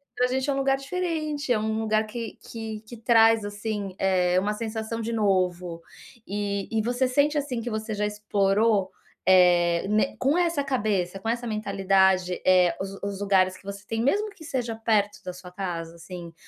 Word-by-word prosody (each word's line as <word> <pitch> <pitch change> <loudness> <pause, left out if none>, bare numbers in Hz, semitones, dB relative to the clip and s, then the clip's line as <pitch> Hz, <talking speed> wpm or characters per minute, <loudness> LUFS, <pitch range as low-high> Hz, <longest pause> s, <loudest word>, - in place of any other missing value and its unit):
para 250 - +2
agente 265 +2 -1
é - - +2
um - - -2
lugar 270 0 +2
diferente, 310 -2 -3
é 215 - +1
um 220 0 -1
lugar 215 0 +1
que 230 0 -6
que 220 -2 -6
que 240 - -9
traz, 225 -1 +5
assim, 205 -2 -4
eh, 185 -1 +2
uma 210 +2 -1
sensação 220 +1 -4
de 230 +1 -3
novo. 180 -5 0 0.4
E 200 -1 -2
e 220 -1 +1
você 245 +3 0
sente, 290 +3 +2
assim, 270 -5 -2
que 240 - -4
você 220 0 -3
já 210 0 -1
explorou, 210 0 +1 0.3
eh, 175 -2 +5
né 215 +6 +1
com 280 +6 +2
essa 335 -5 +1
cabeça, 205 -8 -1
com 225 - -7
essa 240 +1 -1
mentalidade, 195 -4 +2
eh, 180 -2 +5
os 195 +1 -4
os 200 -1 -3
lugares 185 -2 +2
que - - -20
você 200 +1 -7
tem, 225 +1 -2
mesmo 415 - +1
que 330 -6 -13
seja 245 -7 -2
perto 215 -2 +1
da 180 - -4
sua 180 0 -11
casa, 170 -3 -5
assim. 170 0 -9
210 Hz, 185 wpm, -26 LUFS, 190-240 Hz, 0.4 s, traz